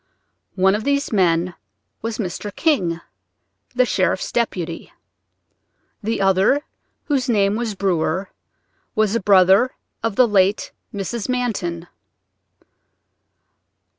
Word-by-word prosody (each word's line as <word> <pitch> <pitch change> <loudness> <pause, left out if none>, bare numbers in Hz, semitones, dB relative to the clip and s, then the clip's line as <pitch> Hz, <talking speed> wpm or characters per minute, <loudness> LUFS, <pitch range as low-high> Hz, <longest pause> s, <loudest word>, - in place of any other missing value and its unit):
One 190 +1 +4
of 210 +1 -1
these 280 +1 0
men 175 -2 +2 0.5
was 225 -1 -3
Mr. 205 0 -4
King, 180 - +1 0.7
the 255 0 +4
sheriff's 185 -4 0
deputy; 175 -8 -2 1.1
the 225 0 -2
other, 195 +9 +3 0.4
whose 275 -4 -1
name 200 -3 +2
was 225 -2 -2
Brewer, 185 -1 -1 0.6
was 215 0 +2
a - - +2
brother 195 +5 +5 0.3
of 225 -3 -2
the 250 +2 +5
late 200 -1 +2 0.2
Mrs. 205 +4 -4
Manton. 195 -9 -2
200 Hz, 105 wpm, -21 LUFS, 185-235 Hz, 1.1 s, brother